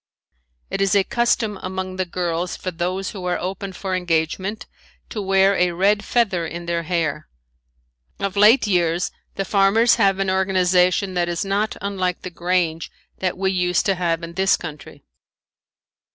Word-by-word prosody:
It - - -2
is 195 0 +2
a 200 - +5
custom 220 -2 0
among 185 0 -4
the 185 -1 -1
girls 175 0 -2
for 185 - -4
those 180 +3 -3
who 190 -3 -8
are 180 0 0
open 190 +1 -4
for 190 +1 -5
engagement 180 +4 -1 0.4
to 215 - -4
wear 195 0 +3
a 180 -1 +2
red 200 +4 +2
feather 200 -8 +1
in 170 +1 -6
their 170 0 -1
hair. 160 -3 -2 0.9
Of 195 0 -2
late 215 +5 +6
years 175 -3 +1 0.2
the 195 - -2
farmers 210 +5 +4
have 195 -4 +3
an 195 -1 0
organization 185 0 +2
that 175 -1 0
is 175 +4 -2
not 200 +2 -1
unlike 185 -3 -2
the 185 - -6
grange 175 -2 -1 0.3
that 185 -1 -1
we 190 0 0
used 180 -2 +1
to 195 - +3
have 170 -2 -1
in 170 0 -7
this 190 +2 +3
country. 155 -4 -9
185 Hz, 165 wpm, -21 LUFS, 175-195 Hz, 0.9 s, late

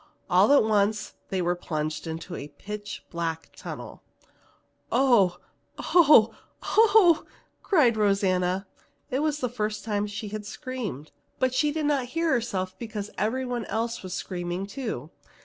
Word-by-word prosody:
All - - +5
at 285 - +6
once 215 -1 +1 0.2
they 185 -2 -1
were 175 +1 +2
plunged 155 -2 -4
into 165 +2 -5
a 140 - -6
pitch 205 +8 -8
black 165 -1 -3
tunnel. - - -8 0.9
"Oh, 235 -9 +4 0.4
oh, 295 -10 +6 0.3
oh!" 415 -7 +5 0.4
cried 285 - +4
Rosanna. 195 -2 +1 0.5
It 260 - +1
was 300 0 0
the 250 - +1
first 215 -3 -3
time 210 -2 -1
she 205 +1 -6
had 215 0 -5
screamed, 220 - -6 0.3
but 255 -1 +1
she 295 +3 +2
did 310 0 -2
not 285 -4 +1
hear 330 -1 +2
herself 190 -7 -1
because 215 -3 -5
everyone 245 +2 -1
else 230 +2 -2
was 185 -1 -5
screaming 175 0 -4
too. 200 - -5
215 Hz, 140 wpm, -26 LUFS, 185-255 Hz, 0.9 s, at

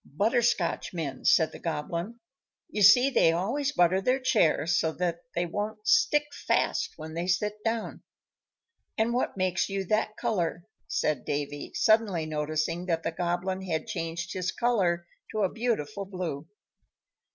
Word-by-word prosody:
"Butterscotchmen," 180 - 0
said 160 -2 +5
the - - -10
Goblin. 170 +7 -4 0.5
"You 210 - -2
see, 245 +7 +7
they 165 -10 +4
always 235 +12 -1
butter 185 -6 +3
their 255 +6 +2
chairs 165 - +2
so 160 -1 0
that 170 -1 -2 0.2
they 175 - +1
won't 210 +4 -4
stick 300 -10 +4
fast - - 0
when 160 0 -8
they 170 +2 -3
sit 210 +4 -1
down." 225 0 -2 1.0
"And 225 +1 +1
what 245 -4 -1
makes 185 0 0
you 195 0 -2
that 215 +2 0
color?" 180 -7 -1 0.2
said 150 -5 0
Davy, 145 0 -4
suddenly 215 -7 +3
noticing 155 +3 -2
that 165 -2 0
the 165 - -1
Goblin 175 +3 -2
had 165 -4 -2
changed 165 +1 -4
his 185 0 -2
color 185 -8 +1 0.3
to 215 -1 0
a 190 - +1
beautiful 215 -5 -2
blue. 170 -6 -5
180 Hz, 145 wpm, -28 LUFS, 165-215 Hz, 1.0 s, see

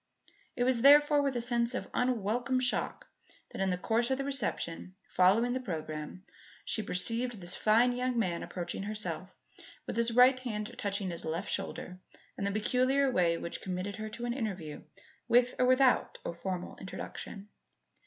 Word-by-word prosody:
It 245 - 0
was 250 -2 +2
therefore 290 +2 +7
with 275 -2 -1
a 240 - 0
sense 240 +1 +1
of - - -4
unwelcome 245 +1 0
shock 250 -1 -1 0.5
that, - - -5
in 195 - +1
the 180 - 0
course 225 +6 0
of 265 - +1
the 275 - -2
reception 205 -9 -2
following 215 +7 +3
the 260 - -1
programme, 155 -4 -6 0.4
she 220 - -1
perceived 230 +4 0
this 175 0 +1
fine 230 +3 +4
young 250 0 -1
man 180 -7 0
approaching 175 +1 -5
herself, 215 +2 -4 0.5
with - - -5
his 235 0 +3
right 255 +1 +6
hand 215 -4 -5
touching 200 -2 -2
his 170 - -7
left 165 +5 -3
shoulder 185 -2 -4 0.4
in 200 - -3
the 200 - 0
peculiar 255 +6 +2
way 170 -6 +2
which 170 - -6
committed 185 +2 -4
her 215 0 -5
to 235 +3 -6
an 240 - -1
interview 190 - -4 0.5
with 245 +1 +4
or 250 - +4
without 255 0 +3
a - - -3
formal 180 +1 -5
introduction. 195 +2 -8
220 Hz, 170 wpm, -31 LUFS, 185-250 Hz, 0.5 s, therefore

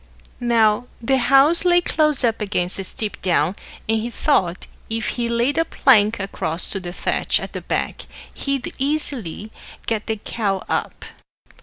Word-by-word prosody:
Now 230 0 +3
the 265 +3 +1
house 275 +8 +5
lay 350 -1 +5
close 305 -5 +1
up 230 -2 +1
against 195 -3 -1
a - - -3
steep 205 +2 -4
down, 175 0 +1 0.3
and 220 0 +1
he 235 - -3
thought 190 - 0 0.2
if 225 -1 -2
he 235 -1 -2
laid 240 +6 +1
a - - +4
plank 220 -8 +4
across 185 -3 -1
to 195 - -2
the 175 -2 -6
thatch - - 0
at - - -7
the - - -5
back - - -3 0.3
he'd 275 -2 -3
easily 260 - -2 0.3
get 220 -2 -2
the 220 - 0
cow 205 -2 -2
up. - - -3
225 Hz, 160 wpm, -21 LUFS, 200-270 Hz, 0.3 s, house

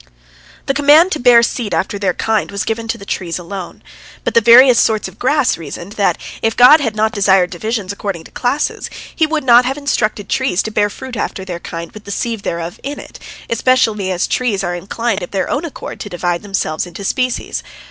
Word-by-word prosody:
" - - -25
The 275 - +1
command 295 +6 +5
to 310 - -1
bear 240 -1 +6
seed 235 -2 -1
after 200 +1 -2
their 190 -3 0
kind 220 -2 0
was 200 -1 -3
given 225 0 -3
to - - -2
the 200 - -11
trees 175 -4 -3
alone. 180 +1 -8 0.4
But - - -1
the 230 - +5
various 240 +2 +7
sorts 220 -1 +1
of - - -14
grass 265 - +1
reasoned, 170 +4 -8
that 205 -1 +1 0.2
if 225 0 0
God 255 +6 +8
had 230 -7 -2
not 220 +1 +1
desired 190 -3 +3
divisions 205 +1 -3
according 200 -5 -5
to - - -15
classes, 265 +4 -2 0.3
He 315 - +2
would 310 -1 -1
not 245 -1 +6
have 265 +2 -2
instructed 215 -8 -1
the - - -1
trees 260 -8 0
to 220 - -5
bear 210 -1 +1
fruit 260 +4 -8
after 190 -2 -4
their 175 -2 -5
kind 170 -1 -7
with 215 - -12
the - - -9
seed 230 +2 -2
thereof 170 -3 -5
in 285 +1 -5
it, - - -11 0.3
especially 225 -5 +1
as 180 -1 0
trees 215 -6 -1
are 175 -1 -2
inclined 200 +4 -2
of 175 - -6
their 190 -2 -1
own 300 +4 -2
accord 325 - -8
to 205 - -6
divide 175 -1 -2
themselves 185 -5 -2
into 175 +3 -9
species. 255 +5 -1
215 Hz, 220 wpm, -16 LUFS, 190-250 Hz, 0.4 s, God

